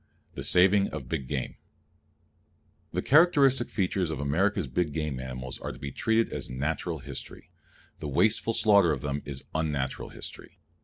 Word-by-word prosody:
The - - -6
Saving 95 +2 +4
of 75 -5 -7
Big 70 -4 -3
Game 65 -2 -3 1.3
The - - -2
characteristic 140 -5 +4
features 95 -3 0
of 80 - -4
America's 90 +7 +1
big 75 +4 -1
game 75 -4 -2
animals 65 0 -6
are - - -5
to - - -11
be 70 -1 -6
treated 110 - +1
as - - -4
natural 70 +5 -2
history. - - -9 0.5
The 75 - -5
wasteful 110 +9 +2
slaughter 100 -6 +5
of 65 - -4
them 70 0 -2
is 70 -2 -5
unnatural 75 -4 -2
history. - - -9
80 Hz, 155 wpm, -28 LUFS, 70-100 Hz, 1.3 s, slaughter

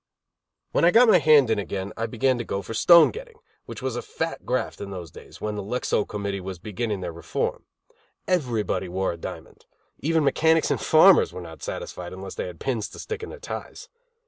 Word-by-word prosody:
When - - +1
I 170 - +7
got 235 +6 +6
my 185 - +7
hand 150 -6 +5
in 110 - +1
again, 100 0 -4
I 115 0 -2
began 125 +2 +1
to - - -2
go 100 -3 -4
for 115 - -7
stone 170 +8 +7
getting, 470 0 -10 0.3
which 135 - -8
was 130 -3 -2
a 120 - -2
fat 165 0 -5
graft 130 +1 -2
in 100 - -5
those 90 -5 -7
days, - - -13
when 105 0 -3
the 105 - -4
Lexow 105 0 -1
committee 100 -2 -4
was 95 0 -6
beginning 105 +2 -4
their 90 -1 -4
reform. 85 - -3 0.6
Everybody 120 - 0
wore 95 +2 -1
a 85 - -7
diamond. - - -9 0.3
Even 160 +1 +1
mechanics 160 +3 +3
and - - 0
farmers 165 +3 +6
were - - -7
not 80 -2 -10
satisfied 90 0 -6
unless 95 +1 -8
they - - -4
had 90 -2 -10
pins 115 -5 -2
to - - -13
stick 445 -1 -5
in 440 - -6
their 485 - -9
ties. - - -8
115 Hz, 210 wpm, -25 LUFS, 95-160 Hz, 0.6 s, I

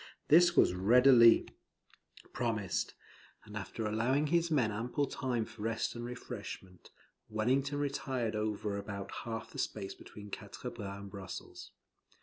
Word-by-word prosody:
This 175 +3 +6
was - - +6
readily 115 +5 +6 0.9
promised; 110 -6 -1 0.5
and 105 -1 -11
after 110 +2 -4
allowing 120 +7 +1
his 170 +2 +2
men 130 -9 +2
ample 120 +7 -1
time 125 -4 -2
for 110 - -12
rest 115 0 -1
and 120 - -6
refreshment, 110 -6 -8 0.4
Wellington 130 +6 +1
retired 130 -5 -1
over 105 -1 -2
about 100 -1 -6
half 115 -1 -5
the - - -7
space 95 - -3
between 105 -1 -12
Quatre - - -6
Bras 100 -1 -6
and 100 -1 -9
Brussels. 95 -2 -8
115 Hz, 135 wpm, -33 LUFS, 105-130 Hz, 0.9 s, This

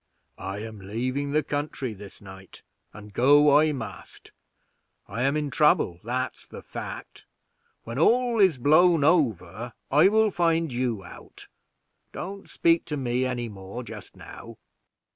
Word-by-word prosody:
"I 95 +2 -5
am 110 -2 -8
leaving 125 +8 -3
the 150 +2 +1
country 145 -4 -3
this 100 -1 -12
night, 95 -1 -13 0.3
and 105 0 -12
I 145 +3 +5
must 115 -8 -8
go. - - -27
I 115 - -3
am 140 +3 +1
in 150 -2 -2
trouble, 140 - +2
that's 125 +2 -4
the - - -11
fact; - - -8 0.6
when 115 +3 -5
all 240 +5 +3
is 185 -8 +4
blown 155 +4 +4
over, 120 - +1 0.2
I 150 +6 +6
will 215 +1 +3
find 165 -3 +1
you 120 -5 -2
out. 90 - -13 0.6
Don't 195 +1 -7
speak 165 0 +2
to 150 - -4
me 125 -1 -1
any 125 -2 -3
more 100 +3 -8
just 110 -4 -11
now." - - -11
130 Hz, 145 wpm, -26 LUFS, 110-155 Hz, 0.6 s, I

